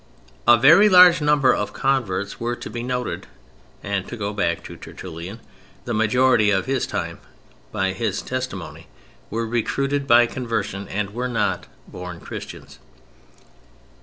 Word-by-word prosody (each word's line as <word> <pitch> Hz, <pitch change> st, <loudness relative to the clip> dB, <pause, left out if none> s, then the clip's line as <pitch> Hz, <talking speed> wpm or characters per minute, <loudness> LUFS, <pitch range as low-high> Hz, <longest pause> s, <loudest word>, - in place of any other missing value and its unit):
A 120 Hz, -, +8 dB
very 165 Hz, -, +7 dB
large 180 Hz, -3 st, +7 dB
number 150 Hz, -3 st, +4 dB
of -, -, -3 dB
converts 105 Hz, -8 st, -1 dB
were 120 Hz, +1 st, -2 dB
to -, -, -9 dB
be 120 Hz, -, -5 dB
noted 125 Hz, 0 st, -3 dB, 0.6 s
and 100 Hz, -1 st, -2 dB
(to 120 Hz, -, -7 dB
go 105 Hz, -1 st, -3 dB
back 85 Hz, -5 st, -1 dB
to -, -, -9 dB
Tertullian) 85 Hz, +7 st, -9 dB, 0.5 s
the 120 Hz, -, -3 dB
majority 110 Hz, 0 st, +3 dB
of 95 Hz, -2 st, +1 dB
his 135 Hz, -2 st, -1 dB
time, -, -, -4 dB, 0.5 s
by 95 Hz, 0 st, -1 dB
his 110 Hz, +4 st, -2 dB
testimony, 130 Hz, -9 st, -5 dB, 0.4 s
were 115 Hz, +2 st, -2 dB
recruited 135 Hz, +5 st, -1 dB
by 120 Hz, -1 st, +6 dB
conversion, 110 Hz, -5 st, -4 dB
and 100 Hz, 0 st, -3 dB
were 125 Hz, +2 st, -3 dB
not 110 Hz, -4 st, -1 dB, 0.2 s
born 90 Hz, -2 st, -8 dB
Christians. -, -, -9 dB
115 Hz, 140 wpm, -22 LUFS, 100-130 Hz, 0.6 s, A